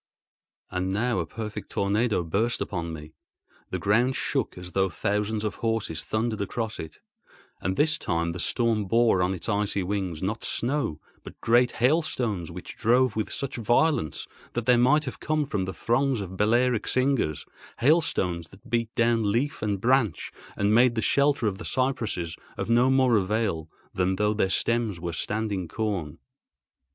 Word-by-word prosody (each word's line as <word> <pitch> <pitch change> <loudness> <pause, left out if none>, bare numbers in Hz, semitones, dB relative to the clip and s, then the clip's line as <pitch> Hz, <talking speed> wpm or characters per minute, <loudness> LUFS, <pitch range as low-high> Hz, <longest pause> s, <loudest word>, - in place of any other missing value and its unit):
And 90 0 -1
now 115 +3 0
a 85 - -2
perfect 110 +2 -6
tornado 105 0 +1
burst 100 +9 0
upon 85 -4 -3
me. 75 -1 -9 0.6
The - - -2
ground 120 +6 +2
shook - - -1
as 90 0 -8
though 95 +2 +1
thousands 105 +3 -1
of 105 - -3
horses 115 -8 -1
thundered 110 -1 -1
across 110 +2 -3
it; 80 -1 -7 0.6
and 95 0 -1
this 150 0 +2
time 85 -2 -1
the 90 - -6
storm 115 +1 +1
bore 115 -1 +3
on 90 +1 +1
its 85 - -8
icy 100 -3 0
wings, 95 -4 -3
not 110 +4 -2
snow, 130 - -1 0.2
but - - -11
great 120 +2 +3
hailstones 125 - 0
which 90 +1 -8
drove 125 +1 +3
with 110 -1 -2
such 140 -2 -3
violence 120 - +1 0.3
that 120 -1 -2
they 125 0 +5
might 130 +6 +4
have 130 - -6
come 155 -1 0
from 100 -8 -2
the 95 - -4
thongs 120 - +1
of 95 -2 -6
Balearic 120 +3 +2
slingers—hailstones 120 - 0
that 95 +7 -17
beat 115 -1 +1
down 115 -3 +2
leaf 135 +7 -1
and 105 -2 -1
branch 120 - +1 0.3
and 100 +1 +2
made 120 +1 +5
the 110 - -1
shelter 140 -2 +2
of 100 -2 -1
the - - -6
cypresses 110 -11 -1 0.2
of - - -2
no 120 +2 +5
more 130 -3 +4
avail 95 -5 -1 0.2
than 95 +1 +1
though 105 +2 +1
their 105 -3 +1
stems 115 -1 0
were 85 0 -4
standing 100 -1 -2
corn. 90 -6 -3
110 Hz, 165 wpm, -26 LUFS, 95-120 Hz, 0.6 s, they